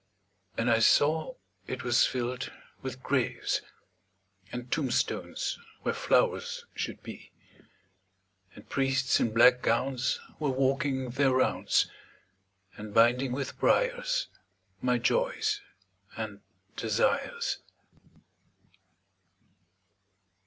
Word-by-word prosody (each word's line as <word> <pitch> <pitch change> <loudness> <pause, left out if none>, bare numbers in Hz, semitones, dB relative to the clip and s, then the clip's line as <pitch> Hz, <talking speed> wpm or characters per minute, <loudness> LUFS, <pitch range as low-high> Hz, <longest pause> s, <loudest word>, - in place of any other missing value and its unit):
And 115 - 0
I 115 -1 +4
saw 155 - +3 0.3
it 130 +1 -4
was 120 -1 +4
filled 125 0 -3 0.3
with 130 -1 -6
graves, 135 -3 0 0.9
And 125 0 -6
tombstones 135 -6 -1 0.2
where - - 0
flowers 480 0 +1
should - - -5
be; - - -10 1.2
And - - -14
priests 135 -1 +1
in 115 - +1
black 125 +2 +6
gowns 130 +2 +1 0.2
were 150 -2 0
walking 135 -1 0
their 135 +2 +3
rounds, 130 0 +2 0.9
And 105 -1 -9
binding 120 +3 +4
with 135 +1 -4
briars - - +2 0.6
my - - +2
joys 440 -4 +1 0.6
and - - -5 0.3
desires. 475 0 0
135 Hz, 90 wpm, -29 LUFS, 125-160 Hz, 1.2 s, black